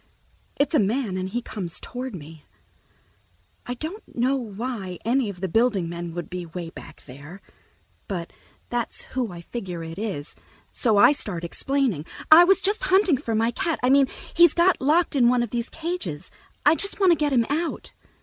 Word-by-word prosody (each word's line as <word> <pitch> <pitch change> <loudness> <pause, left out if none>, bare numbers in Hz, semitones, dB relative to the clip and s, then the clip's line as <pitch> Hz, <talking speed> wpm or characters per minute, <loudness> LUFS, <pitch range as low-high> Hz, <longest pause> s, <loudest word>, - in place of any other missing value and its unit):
It's 285 +4 0
a - - +5
man, 215 0 0
and 185 0 -3
he 240 +4 -3
comes 180 -8 -5
toward 250 -2 -6
me. 160 -1 -11 1.2
I 245 - -3
don't 335 - -7
know 255 +3 +2
why 220 -5 -5
any 245 -1 +1
of 180 -3 -9
the 190 - -1
building 210 -2 +2
men 170 0 -6
would 175 -1 -4
be 180 -1 -5
way 170 0 -7
back - - -12
there, 145 +8 -11 0.7
but 175 -4 -5 0.4
that's 240 -1 -2
who 250 -5 -1
I 170 -1 -9
figure 180 -4 -6
it 165 +3 -7
is, 190 -9 -4 0.4
so 225 -5 +2
I 205 - +7
start 200 - -2
explaining. 230 - -1 0.2
"I 325 +3 +11
was 390 +2 +4
just 410 +2 0
hunting 375 -5 +4
for 230 -2 -3
my 225 +2 +2
cat... 325 +6 -2
I 250 - +4
mean, 275 -1 +5 0.3
he's 345 0 +6
got 350 +1 +3
locked 310 +4 +2
in 240 -3 +5
one 245 -1 +2
of 235 - -5
these 235 0 -2
cages. 320 - -5 0.3
I 295 - +7
just 395 +5 0
want 380 -3 +5
to - - +6
get 300 -2 0
him 240 -3 +3
out." 320 +3 -3
235 Hz, 190 wpm, -24 LUFS, 180-280 Hz, 1.2 s, I